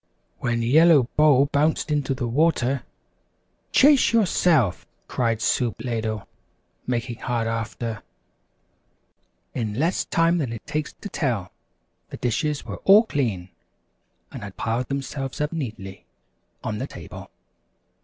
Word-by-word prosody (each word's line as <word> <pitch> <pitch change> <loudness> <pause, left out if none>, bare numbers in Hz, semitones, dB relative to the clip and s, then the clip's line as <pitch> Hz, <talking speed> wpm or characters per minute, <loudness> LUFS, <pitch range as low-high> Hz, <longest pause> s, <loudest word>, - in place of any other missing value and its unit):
When 120 -1 -1
Yellow 155 +3 +6
Bowl 145 -3 +5
bounced 150 +2 +1
into 140 -3 0
the 125 -2 -3
water, 135 -1 +1 0.9
"Chase 280 -2 +5
yourself!" 170 - +2 0.2
cried 115 -3 -1
Soup 120 -5 +1
Ladle, 110 -4 -3 0.6
making 120 -1 -2
hard 120 -2 -2
after. 115 0 -4 1.5
In 110 -4 -3
less 165 - +1
time 165 +1 +2
than 130 -7 -2
it 115 - -8
takes 150 0 -3
to 205 - -6
tell, 115 - -2 0.6
the - - -7
dishes 145 +5 -1
were - - -6
all 205 +3 +6
clean, 115 - -2 0.8
and 130 - -8
had 100 -2 -9
piled 115 +3 -1
themselves 135 -1 -4
up 150 +2 -1
neatly 110 -11 -6 0.6
on - - -3
the - - -3
table. - - -10
130 Hz, 125 wpm, -24 LUFS, 115-150 Hz, 1.5 s, Yellow